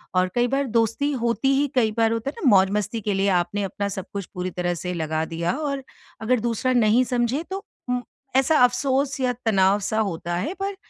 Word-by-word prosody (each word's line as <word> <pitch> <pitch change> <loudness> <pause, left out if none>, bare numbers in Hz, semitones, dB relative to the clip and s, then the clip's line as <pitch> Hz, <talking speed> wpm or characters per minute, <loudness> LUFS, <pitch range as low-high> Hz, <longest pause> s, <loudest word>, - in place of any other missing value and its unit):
और 185 0 +3
कई 240 0 +3
बार 275 +2 0
दोस्ती 230 +5 +1
होती 235 -2 0
ही 285 +1 +2
कई 225 -4 +3
बार 225 -1 +3
होता 230 +4 -1
है - - -7
ना, - - +3
मौज़-मस्ती 205 +3 +2
के 205 0 -1
लिए 195 +1 +1
आपने 185 +3 0
अपना 200 +1 -3
सब 190 -1 -5
कुछ 200 -2 -4
पूरी 180 0 -3
तरह 175 0 -1
से 180 +1 -4
लगा 160 -1 -1
दिया 165 +1 -2
और 280 -3 -3 0.4
अगर 245 +2 +2
दूसरा 240 +3 0
नहीं 235 +1 +4
समझे 250 +5 0
तो 390 +1 -4 0.3
उम, 250 0 0 0.3
ऐसा 270 +4 +4
अफ़सोस 270 +2 +1
या 255 -1 +1
तनाव 195 -1 +3
सा 215 +2 -1
होता 175 -4 -2
है 300 - -2
पर 395 0 -2
225 Hz, 210 wpm, -23 LUFS, 190-260 Hz, 0.4 s, नहीं